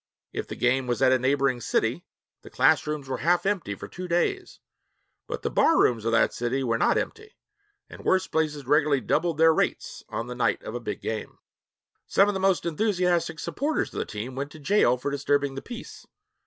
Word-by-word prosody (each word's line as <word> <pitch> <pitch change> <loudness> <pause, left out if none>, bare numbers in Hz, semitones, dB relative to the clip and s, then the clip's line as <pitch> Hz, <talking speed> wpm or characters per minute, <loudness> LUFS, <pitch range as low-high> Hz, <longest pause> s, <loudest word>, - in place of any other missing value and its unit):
If - - -4
the - - -6
game 125 +1 +1
was 120 +2 0
at 130 - +5
a 130 - +4
neighboring 130 -1 +1
city, - - -1 0.3
the - - -13
class - - +3
rooms 150 -3 -4
were 130 -1 -3
half 175 +5 +2
empty 190 - -1
for - - -9
two 180 0 -7
days; 275 - -1 0.7
but - - -5
the - - -1
bar 325 - +4
rooms 115 -3 +2
of 115 - +1
that 115 - +3
city 125 +3 -1
were 115 -2 0
not - - +3
empty, 435 -1 -5 0.5
and - - -12
worse 185 0 +2
places 150 -4 -1
regularly 145 0 +3
doubled 165 +8 0
their 160 0 +6
rates - - -2
on 115 - -3
the 125 - -6
night 125 - 0
of 110 - -6
a 120 - -3
big 110 -3 -5
game. 110 -1 -5 0.7
Some 200 - +4
of 205 - +1
the 190 - -2
most 190 -2 +2
enthusiastic 175 -2 0
supporters 295 - -2
of - - -4
the - - -1
team 110 +5 -6
went 140 +2 -4
to 155 - -11
jail 145 -6 +3
for 140 +3 -3
disturbing 140 0 0
the 135 - -6
peace. 240 -2 -10
145 Hz, 210 wpm, -26 LUFS, 125-175 Hz, 0.7 s, their